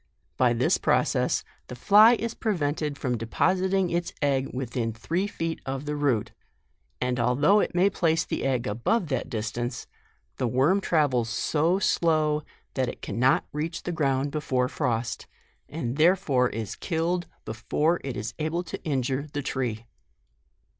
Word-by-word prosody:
" - - -46
By 125 -2 +4
this 120 +2 +2
process - - +1 0.2
the 125 - -7
fly 210 - +7
is 230 0 -3
prevented 150 -9 -1
from 125 -5 -2
depositing 185 - +1
its 170 0 -1
egg 135 -2 +1
within 120 -3 -3
three 170 - -2
feet 165 -5 -4
of 135 +1 -4
the 150 0 -2
root, 140 -7 0 0.7
and 125 0 -1
although 140 - +4
it 180 - -1
may 180 +2 +4
place 165 -4 +1
the - - -3
egg 130 -3 0
above 135 - 0
that 130 - -2
distance, 120 +1 -3 0.5
the 125 - 0
worm 140 - +2
travels 140 -10 +1
so 155 - +1
slow 155 -5 +2 0.3
that 130 -2 0
it - - -9
cannot 130 +3 +2
reach 160 +3 -3
the 180 - -3
ground 140 -4 0
before 130 -4 0
frost, 120 -1 -2 0.4
and 140 -5 -4
therefore 155 -7 +3
is 110 -2 -5
killed 175 +1 -1 0.2
before 150 +9 0
it 135 -2 -4
is 110 +2 -4
able 160 +3 -1
to - - -7
injure 135 -1 -1
the 145 -1 -2
tree." 120 -5 -3
145 Hz, 155 wpm, -26 LUFS, 125-170 Hz, 0.7 s, fly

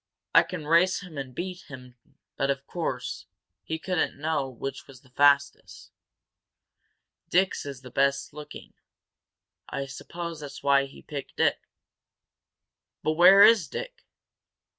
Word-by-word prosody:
I - - +8
can 170 -5 -6
race 170 +5 +3
him 180 -5 -11
and 130 -2 -7
beat 180 +2 -5
him 125 -4 -11 0.4
but, 135 - -1
of 140 0 -2
course, 135 -8 -4 0.4
he 160 - -3
couldn't 180 -2 -1
know 150 -2 -1
which 130 +2 -7
was 135 -2 -15
the 130 - -24
fastest. 140 +1 +1 1.4
Dick's 185 -4 +1
is 135 -3 -7
the 125 - -11
best 140 +2 0
looking. 150 0 -10 1.0
I 140 - -3
suppose 170 +4 -7
that's 145 -2 -9
why 140 -1 +4
he 135 - -14
picked 145 -3 -8
it." - - +3 1.4
"But 155 - +1
where 185 +5 +8
is 215 -9 +6
Dick?" - - -8
145 Hz, 135 wpm, -27 LUFS, 135-175 Hz, 1.4 s, I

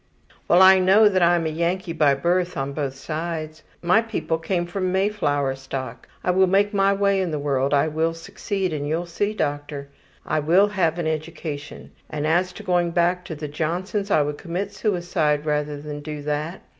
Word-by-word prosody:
``Well, 175 - +6
I 190 0 +8
know 195 +4 +6
that 190 -3 +2
I'm 170 -1 +3
a - - 0
Yankee 170 +2 -1
by 150 -4 +3
birth, 175 +5 0
on 135 0 -3
both 140 -2 -3
sides. 155 +1 -5 0.2
My 180 +6 +4
people 165 -8 -2
came 175 +1 -1
from 185 +1 -2
Mayflower 180 -9 0
stock. 135 -2 -7 0.2
I 180 - +2
will 190 +1 +4
make 200 +3 +2
my 195 0 +3
way 200 -1 +2
in 185 - -1
the 155 - -2
world, 140 -2 0
I 145 +1 +3
will 160 +2 -1
succeed, 195 +1 -3
and 145 -1 -3
you'll 165 +3 -1
see, 205 +5 -2
doctor. 145 -3 -3 0.4
I 155 - 0
will 175 +7 +4
have 175 -5 0
an 170 - -2
education. 155 -2 -5 0.2
As 160 +5 0
to 215 - -10
going 175 -3 +1
back 175 +1 +1
to 160 - -6
the 150 0 -5
Johnsons, 180 +7 -2
I 155 -6 +4
would 145 0 -4
commit 190 +3 -4
suicide 175 -7 0
rather 150 -1 -1
than 150 0 -6
do 150 -1 -6
that. 150 +4 -3
165 Hz, 190 wpm, -23 LUFS, 150-185 Hz, 0.4 s, I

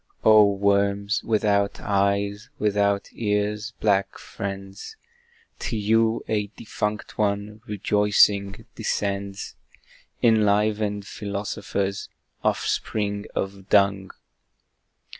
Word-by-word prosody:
Oh 105 -2 +7
worms, 100 +1 +1
without 105 -2 +1
eyes, 100 +2 0
without 100 -1 +1
ears, 105 +1 -1
black 100 -2 +1
friends! 95 - -7 0.6
To 115 - -3
you 110 +2 +2
a 105 -2 0
defunct 105 -1 -4
one, 105 +1 -1
rejoicing, 105 -1 +2
descends, 100 -1 -3 0.7
Enlivened 105 -2 +2
Philosophers 100 -1 -3 0.3
offspring 100 -1 -1
of 95 0 -4
Dung! 100 -1 +3
100 Hz, 80 wpm, -24 LUFS, 100-105 Hz, 0.7 s, Oh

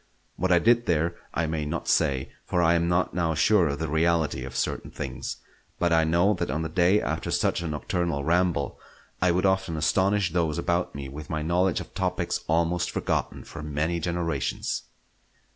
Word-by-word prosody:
What 95 +1 0
I 90 - +6
did 120 +5 +3
there 85 +1 +1 0.2
I 85 - 0
may 80 -1 -2
not 75 +3 -4
say, 65 -1 +1
for 90 - -1
I 85 -1 +4
am 85 0 +2
not 90 +1 +1
now 85 -2 0
sure 90 +2 +4
of 70 -1 -2
the 80 +2 -2
reality 80 -3 +1
of 65 0 -7
certain 65 - -2
things; - - -5 0.4
but 85 -1 +2
I 80 -1 +4
know 85 +6 +3
that 90 - -3
on 80 +5 -1
the 80 - -3
day 90 +5 +3
after - - -3
such - - +1
a 85 - -3
nocturnal 80 -1 -2
ramble 85 -3 +1 0.4
I 90 - +4
would 90 +2 +2
often 95 -3 +1
astonish 95 +4 +2
those 85 -3 +1
about 85 -1 -1
me 70 -1 -5
with 75 +3 -9
my 80 0 -2
knowledge 90 +2 +1
of - - -11
topics - - -1
almost 85 +2 +1
forgotten - - -2
for 80 - -9
many 75 +3 -1
generations. 85 0 -2
85 Hz, 190 wpm, -26 LUFS, 80-90 Hz, 0.4 s, I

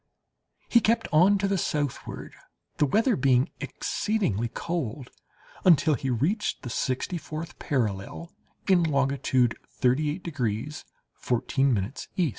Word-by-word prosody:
He 235 - +5
kept 230 +1 +1
on 180 +6 +5
to 195 0 0
the 195 -1 0
southward, 145 -5 -3 0.4
the 150 - +3
weather 225 - +3
being 130 -4 +2
exceedingly 140 - -1
cold, 140 -7 -4 0.5
until 160 -3 +5
he 135 0 -2
reached 155 - 0
the 125 - -5
sixty 130 +9 -1
fourth 160 +2 -7
parallel, 120 - -2 0.4
in 185 -3 +5
longitude 135 -5 +1
38 145 +7 0
degrees 140 -2 -3 0.3
14' 125 -3 0 0.2
E. 175 -4 +2
145 Hz, 115 wpm, -27 LUFS, 125-175 Hz, 0.5 s, He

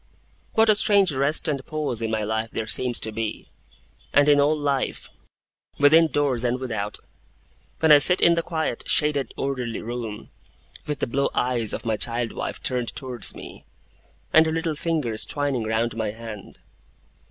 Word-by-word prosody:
What 225 0 +4
a 215 - +6
strange 200 -3 +4
rest 140 +5 +1
and 140 -3 -2
pause 145 -7 -4
in 115 - -2
my 110 -1 -1
life 110 +1 -2
there 110 - -4
seems 120 +2 +1
to 110 - 0
be 110 0 -5 0.6
and 145 0 +4
in 145 -1 +5
all 150 +2 +3
life, 140 -2 -2 0.7
within 160 +3 +6
doors 140 -4 0
and 125 +1 0
without 110 -5 -4 0.8
when 160 -1 +4
I 145 - +9
sit 180 +6 +6
in 170 - +5
the 170 - 0
quiet, 160 -7 -3
shaded, 150 -3 +1
orderly 125 -4 -3
room, 115 -2 -6 0.6
with 150 -1 -3
the - - +2
blue 140 +3 0
eyes 120 -4 +1
of - - -5
my 110 -2 0
child 120 0 -2
wife - - -5
turned 125 -2 -1
towards 125 -4 -3
me, - - -11 0.7
and 160 0 +6
her - - -1
little 165 -1 -2
fingers 150 -9 -1
twining 140 -5 -2
round 110 +1 -1
my 110 -2 -2
hand! 110 -2 -10
130 Hz, 170 wpm, -24 LUFS, 115-150 Hz, 0.8 s, I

